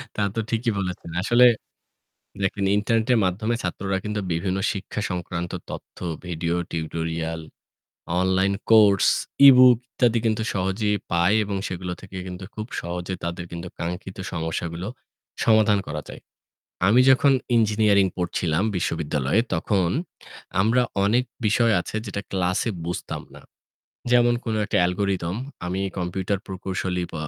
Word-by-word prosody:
তা 105 - -1
তো 115 - 0
ঠিকই 115 0 0
বলেছেন। 90 -3 -5
আসলে 120 +5 +5 1.0
দেখেন 95 +1 0
ইন্টারনেটের 115 +3 +2
মাধ্যমে 105 +6 0
ছাত্ররা 95 0 -2
কিন্তু 105 0 -2
বিভিন্ন 95 +3 -1
শিক্ষা 100 +1 -5
সংক্রান্ত 85 -1 -4 0.2
তথ্য, - - -9 0.3
video, 85 -1 -2 0.2
tutorial, 80 0 -3 0.8
online 95 +1 +2 0.2
course, 105 -5 +6 0.4
ebook 125 -2 +8
ইত্যাদি 120 -3 +2
কিন্তু 110 0 +1
সহজেই 100 +2 0 0.2
পায় 85 +4 +3
এবং 100 -1 -3
সেগুলো 90 0 -4
থেকে 95 -1 -11
কিন্তু 90 +1 -7
খুব 110 0 -5
সহজে 90 +2 -4
তাদের 85 +1 -4
কিন্তু 85 +1 -6
কাঙ্ক্ষিত 90 +2 -5 0.2
সমস্যাগুলো 85 +2 -3 0.6
সমাধান 110 -2 +4
করা 75 +1 -4
যায়। - - -9 0.7
আমি 115 +5 +6
যখন 135 +1 +5 0.2
ইঞ্জিনিয়ারিং 105 -3 +4
পড়ছিলাম 90 0 0
বিশ্ববিদ্যালয়ে 75 0 0
তখন 90 +2 +1 0.7
আমরা 115 +5 +3 0.2
অনেক 120 +5 +3 0.2
বিষয় 115 +2 +3
আছে 95 - -6
যেটা 100 -1 -4
ক্লাসে 95 +4 0 0.2
বুঝতাম 90 - -4
না। - - -12 0.7
যেমন 120 0 +5
কোনো 110 -2 -1
একটা - - 0
অ্যালগরিথম 90 -1 0 0.3
আমি 90 +2 -2 0.2
কম্পিউটার 95 +2 -2
প্রকৌশলী 95 -1 -3
প - - -19
95 Hz, 130 wpm, -24 LUFS, 85-110 Hz, 1.0 s, ebook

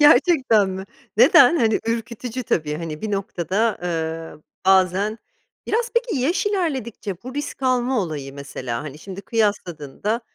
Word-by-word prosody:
Gerçekten 275 - +5
mi? 190 0 -5 0.3
Neden? 345 - +7
Hani, 225 -7 +2
ürkütücü 235 +2 -3
tabii, 155 -9 0
hani, 155 -2 -5
bir 215 - -2
noktada, 195 +2 -1
eee, 165 -2 -3 0.2
bazen 190 +3 +3 0.5
Biraz 470 +2 0
peki, 470 -6 +1
yaş 330 +11 +1
ilerledikçe 265 - -2
bu 255 +2 -8
risk 290 -2 -5
alma 255 -1 +2
olayı, 145 -6 -5
mesela, 130 -4 -5
hani, 150 -1 -8
şimdi 195 +2 -8
kıyasladığında 205 - -1
210 Hz, 135 wpm, -22 LUFS, 165-255 Hz, 0.5 s, Neden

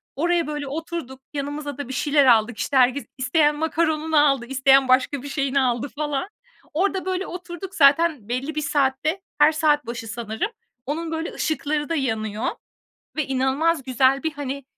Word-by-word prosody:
Oraya, 340 +2 +1
böyle, 295 -2 -4
oturduk, 290 -3 -6
yanımıza 285 0 -4
da 285 -3 -5
bir 265 - -6
şeyler 290 0 +3
aldık, 230 -2 +4
işte, 280 - -1
herkes, 255 +2 +3
isteyen 295 +3 +2
macaron'unu 315 0 0
aldı, 275 -4 +2
isteyen 270 +1 +4
başka 255 +1 +2
bir - - -6
şeyini 275 -1 0
aldı 245 +2 0
falan. 295 +4 -2 0.4
Orada, 380 +3 0
böyle, 375 0 -2
oturduk. 355 +1 -8
Zaten 285 -5 +4
belli 265 +5 -3
bir 305 - -1
saatte, 285 +5 0 0.2
her 295 +1 +7
saat 305 -3 +2
başı 235 -1 -6
sanırım, 220 - -3 0.3
onun, 320 +4 -3
böyle, 320 +1 -3
ışıkları 300 -1 -2
da 330 - 0
yanıyor 220 -5 -2 0.7
ve 310 -3 0
inanılmaz 270 +4 +1
güzel 260 +2 +2
bir, 320 -1 -1
hani, 280 -2 -5
285 Hz, 160 wpm, -23 LUFS, 260-315 Hz, 0.7 s, her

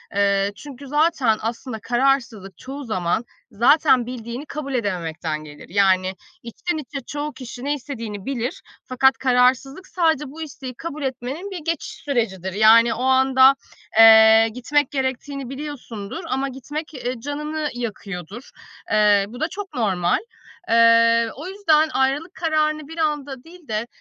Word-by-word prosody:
eee, 200 0 +2
çünkü 280 +4 -11
zaten 295 -6 +2
aslında 230 +1 -5
kararsızlık 235 -5 0
çoğu 275 +6 -8
zaman 200 -1 -1 0.3
zaten 250 +3 +4
bildiğini 245 +2 -6
kabul 285 -2 -6
edememekten 170 -8 -3
gelir. 150 -1 -13
Yani 190 0 +2 0.3
içten 315 +9 -4
içe 290 -1 -6
çoğu 295 +1 -4
kişi 255 -1 -9
ne 290 - +1
istediğini 230 -8 -6
bilir. 270 +5 -3 0.2
Fakat 255 -1 +3
kararsızlık 260 +6 +1
sadece 320 -5 +1
bu 320 +3 -10
isteği 275 -4 -7
kabul 305 +1 -6
etmenin 265 +9 -4
bir 375 - -5
geçiş 330 -2 -2
sürecidir. 195 -9 -3
Yani 225 +3 +6
o 250 - -4
anda, 265 0 +5 0.4
eee, 220 0 +8
gitmek 290 +3 0
gerektiğini 265 0 -3
biliyorsundur 265 -7 -7
ama 270 +1 -1
gitmek, 295 +5 -7
eee, 250 -2 -4
canını 300 +3 -3
yakıyordur. 210 - -7 0.4
Eee, 205 -2 +4
bu 240 +4 -10
da 315 - +1
çok 390 -1 -7
normal. 190 -8 +1 0.5
Eee, 230 0 +5
o 305 +6 -8
yüzden 320 -6 +2
ayrılık 275 +6 0
kararını 310 -2 0
bir 325 - -10
anda 290 -5 -2
değil 340 -2 -16
de, 220 +2 -2
255 Hz, 140 wpm, -22 LUFS, 225-295 Hz, 0.5 s, eee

